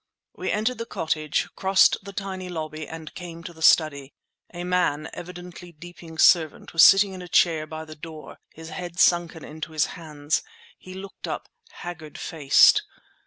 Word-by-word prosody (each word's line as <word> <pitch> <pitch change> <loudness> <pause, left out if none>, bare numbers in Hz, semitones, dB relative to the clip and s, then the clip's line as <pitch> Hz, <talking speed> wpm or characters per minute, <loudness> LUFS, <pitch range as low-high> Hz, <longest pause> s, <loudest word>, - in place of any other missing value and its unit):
We - - -4
entered 220 +4 -1
the 230 - -5
cottage, 155 -2 -1
crossed 190 0 +4
the 200 +1 -9
tiny 190 -2 -5
lobby, 155 -2 -5
and 160 -1 -9
came 170 -2 -9
to 170 - -8
the 160 - -16
study. 145 -4 +3 0.4
A 175 0 -6
man, 175 -4 0
evidently 175 0 -9
Deeping's 165 0 -4
servant, 160 -4 +3
was 165 - +5
sitting 195 0 +7
in 185 - -8
a 180 - -9
chair 160 -2 +2
by 160 +1 -7
the 155 - -10
door, 155 0 -11
his 160 +1 -11
head 175 +1 -7
sunken 170 -2 +2
in 155 +1 -11
his 155 -1 0
hands. 150 -3 -2 0.4
He 185 0 -11
looked 190 +1 -9
up, - - -5 0.2
haggard 160 -4 -8
faced. 145 -4 +5
165 Hz, 165 wpm, -24 LUFS, 155-180 Hz, 0.4 s, sitting